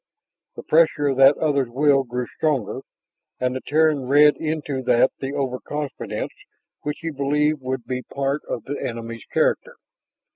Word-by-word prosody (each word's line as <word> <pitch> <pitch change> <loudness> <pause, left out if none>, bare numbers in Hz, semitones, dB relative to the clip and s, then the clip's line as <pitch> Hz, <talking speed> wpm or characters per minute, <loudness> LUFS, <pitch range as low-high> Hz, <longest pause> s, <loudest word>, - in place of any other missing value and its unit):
The - - -8
pressure 155 -2 +3
of 135 - -1
that 135 +1 +7
other's 140 -5 +1
will 135 +2 +3
grew 125 0 -4
stronger. 135 -6 -1 0.6
And 125 0 0
the 130 - -4
Terran 150 -3 +2
read 145 +2 +6
into 150 -4 -3
that 125 +1 +4
the 135 +1 -4
overconfidence 140 +2 -4 0.5
which 150 0 -3
he 165 -1 -3
believed 150 +1 0
would 130 -2 -4
be 125 +1 -3
part 140 +2 -2
of - - -3
the 145 - -5
enemy's 115 -1 -6
character. - - +1
140 Hz, 150 wpm, -22 LUFS, 130-150 Hz, 0.6 s, that